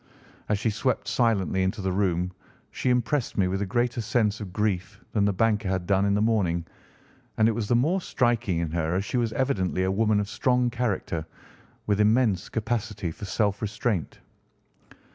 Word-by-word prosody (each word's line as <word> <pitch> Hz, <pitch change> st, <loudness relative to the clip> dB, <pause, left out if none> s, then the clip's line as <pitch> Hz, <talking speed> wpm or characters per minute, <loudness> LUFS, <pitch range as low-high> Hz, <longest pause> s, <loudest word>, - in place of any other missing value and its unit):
As 105 Hz, -, +2 dB
she 110 Hz, +2 st, 0 dB
swept 130 Hz, +5 st, -1 dB
silently 100 Hz, -6 st, +1 dB
into 95 Hz, +4 st, -1 dB
the 95 Hz, -1 st, -1 dB
room 90 Hz, -2 st, 0 dB, 0.4 s
she -, -, -1 dB
impressed 125 Hz, +2 st, 0 dB
me 95 Hz, -2 st, +3 dB
with 95 Hz, +2 st, -1 dB
a 100 Hz, -, -1 dB
greater 120 Hz, +3 st, 0 dB
sense 110 Hz, -1 st, +1 dB
of 100 Hz, -3 st, -6 dB
grief 100 Hz, 0 st, -1 dB
than 105 Hz, -2 st, +2 dB
the 105 Hz, -, +3 dB
banker 105 Hz, 0 st, +1 dB
had 95 Hz, -2 st, -1 dB
done 100 Hz, +1 st, +2 dB
in 100 Hz, -, +2 dB
the 105 Hz, -, +2 dB
morning, 90 Hz, -7 st, +1 dB, 0.7 s
and 110 Hz, -, +5 dB
it -, -, +3 dB
was 110 Hz, -1 st, -2 dB
the 120 Hz, -, +3 dB
more 160 Hz, +11 st, +2 dB
striking 120 Hz, -, 0 dB
in 85 Hz, -2 st, -2 dB
her 80 Hz, 0 st, -1 dB
as 95 Hz, +2 st, 0 dB
she 125 Hz, -, -2 dB
was 115 Hz, -2 st, +1 dB
evidently 95 Hz, -9 st, 0 dB
a 95 Hz, -, +1 dB
woman 105 Hz, +1 st, +2 dB
of 105 Hz, -, -1 dB
strong 125 Hz, +1 st, +1 dB
character, 105 Hz, -9 st, -2 dB, 0.6 s
with 105 Hz, -1 st, +1 dB
immense 105 Hz, -3 st, +3 dB
capacity 110 Hz, -5 st, -2 dB
for 100 Hz, -, -8 dB
self 100 Hz, 0 st, 0 dB
restraint. 105 Hz, -, -2 dB
105 Hz, 185 wpm, -26 LUFS, 95-115 Hz, 0.7 s, and